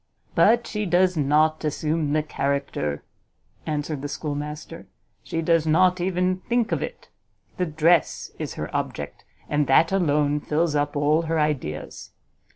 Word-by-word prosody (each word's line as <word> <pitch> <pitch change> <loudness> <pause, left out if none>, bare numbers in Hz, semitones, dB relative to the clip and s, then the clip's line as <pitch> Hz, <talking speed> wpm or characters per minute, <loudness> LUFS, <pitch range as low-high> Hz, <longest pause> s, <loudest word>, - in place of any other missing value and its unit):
"But 235 +1 +4
she 210 -1 -3
does 180 +1 +3
not 155 +2 +2
assume 155 0 -1
the 155 0 +2
character," 140 - -2 0.6
answered 150 -1 -2
the 145 - -3
schoolmaster, 150 +2 -5 0.3
"she 165 +8 -3
does 165 -1 +2
not 180 +3 +3
even 180 0 +1
think 235 -1 +1
of - - 0
it: - - -7 0.5
the 180 - 0
dress 160 +1 +2
is - - -4
her - - -5
object, - - -4 0.2
and 145 -1 +1
that 160 +6 +4
alone 150 -5 +2
fills 155 +2 0
up 145 0 0
all 150 +2 +3
her 165 -1 +1
ideas. 130 - -3
155 Hz, 145 wpm, -24 LUFS, 145-170 Hz, 0.6 s, But